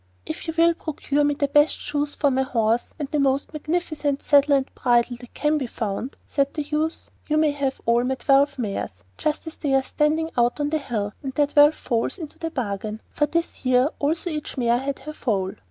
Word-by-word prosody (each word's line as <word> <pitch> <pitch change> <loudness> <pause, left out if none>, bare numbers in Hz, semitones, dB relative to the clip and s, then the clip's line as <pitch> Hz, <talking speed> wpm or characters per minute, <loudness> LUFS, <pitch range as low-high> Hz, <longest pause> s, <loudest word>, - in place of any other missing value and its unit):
'If 155 - -6
you 325 - -3
will 335 +1 +5
procure 295 -3 -1
me 290 0 +2
the 285 0 0
best 295 +2 +4
shoes 290 0 -3
for 285 -2 +2
my 265 +1 +2
horse, 230 -3 0
and 290 - -3
the 300 - +1
most 275 +2 +1
magnificent 305 -2 -2
saddle 285 0 +5
and 270 -1 +1
bridle 245 -1 +2
that 245 0 -14
can 300 0 +1
be 260 - -3
found,' 220 +3 -4
said 280 -1 0
the 300 - -1
youth, 305 +2 -2 0.2
'you 305 - +1
may 310 -1 +4
have 280 -2 -2
all 235 +1 +3
my 260 +1 0
twelve 275 +2 +3
mares 195 - -4 0.2
just 305 +2 -1
as 320 - -8
they 275 -3 0
are 270 - +3
standing 310 +3 0
out 240 +3 +2
on 290 0 0
the 315 - +1
hill, 215 -7 -3
and 270 -3 -5
their 290 +2 +3
twelve 290 +1 +5
foals 230 +6 -1
into 320 -6 -9
the 325 - -2
bargain.' 215 -6 -3
For 295 - +1
this 335 +3 -2
year 255 +1 +4
also 320 +4 0
each 300 -1 -5
mare 240 -1 +2
had 275 +1 -3
her 305 - -5
foal. 195 -10 -1
285 Hz, 220 wpm, -24 LUFS, 245-300 Hz, 0.2 s, will